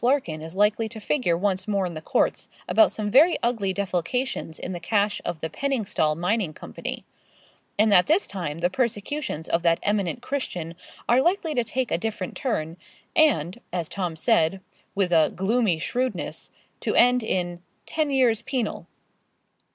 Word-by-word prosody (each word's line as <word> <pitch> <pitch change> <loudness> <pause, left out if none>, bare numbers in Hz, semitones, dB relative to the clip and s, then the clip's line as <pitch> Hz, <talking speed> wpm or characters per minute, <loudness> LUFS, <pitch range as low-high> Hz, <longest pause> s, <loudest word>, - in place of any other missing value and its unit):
Larkin 240 - +1
is 160 +2 -8
likely 210 +2 +2
to 220 - -8
figure 205 - 0
once 190 0 0
more 200 -2 +1
in 175 - -4
the 155 - -6
courts - - 0 0.2
about 330 - +5
some 210 -1 -3
very 310 - +6
ugly 225 -5 +1
defalcations 190 +1 -2
in 180 - -5
the 175 - -5
cash 205 +3 0
of 170 -2 -4
the 160 - -2
Penningstal 205 - 0
Mining 180 -1 0
Company, - - -6 0.7
and 215 +1 +4
that 180 -3 +6
this 335 +6 +3
time 165 -6 -4
the 175 - +2
persecutions 235 - -2
of 165 - +1
that 165 -1 +3
eminent 205 0 0
Christian 180 - -3 0.3
are 245 +2 +5
likely 345 0 +1
to 245 - +1
take 250 +2 -2
a - - +1
different 210 -3 -4
turn, 165 - -2 0.4
and, 240 - +3
as 175 -3 -2
Tom 180 -3 -3
said, 160 +3 +2 0.4
with 195 -3 +1
a 160 -2 +4
gloomy 200 -1 +1
shrewdness, 250 +10 -3 0.3
to - - -1
end 245 +1 +5
in 175 -5 -2 0.2
'ten 310 -2 -1
years 250 -5 +3
penal.' 245 -3 -3
205 Hz, 165 wpm, -25 LUFS, 175-245 Hz, 0.7 s, very